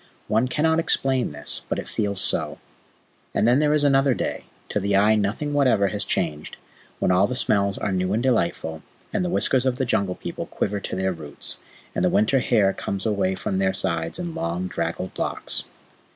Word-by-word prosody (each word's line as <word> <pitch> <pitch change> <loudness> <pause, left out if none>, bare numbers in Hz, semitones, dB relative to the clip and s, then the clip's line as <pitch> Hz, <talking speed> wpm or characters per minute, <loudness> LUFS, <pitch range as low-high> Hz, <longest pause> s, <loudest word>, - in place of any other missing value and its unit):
One 110 +4 +2
cannot 160 +4 +2
explain 135 - +1
this, 75 0 -2
but - - -1
it - - -5
feels 100 -2 0
so. - - +3 0.8
Then 120 +4 +3
there 150 -1 +3
is 150 -1 +3
another 135 -2 +4
day - - -3 0.2
to - - 0
the 100 0 0
eye 105 +2 +5
nothing 110 +8 -1
whatever 125 -9 +3
has 105 -1 -2
changed 75 -3 -2 0.4
when - - +1
all 95 +2 +4
the 125 - -3
smells 100 -5 +1
are - - -2
new 95 0 0
and 110 +4 0
delightful, 85 -9 0 0.3
and 210 -4 +1
the 180 - -1
whiskers 130 -6 +2
of 130 - +1
the 130 +1 -1
Jungle 100 -6 0
People - - -6
quiver 100 0 -2
to 95 - -5
their 95 0 0
roots, 75 -4 -7 0.3
and - - -1
the - - +4
winter 110 +6 +3
hair 105 -6 +3
comes 100 -1 -4
away 100 -3 +1
from 95 0 -2
their 95 0 +2
sides 85 - -1
in 175 -2 -4
long, 85 - -2
draggled 85 +1 -4
locks. - - -1
100 Hz, 195 wpm, -24 LUFS, 95-130 Hz, 0.8 s, eye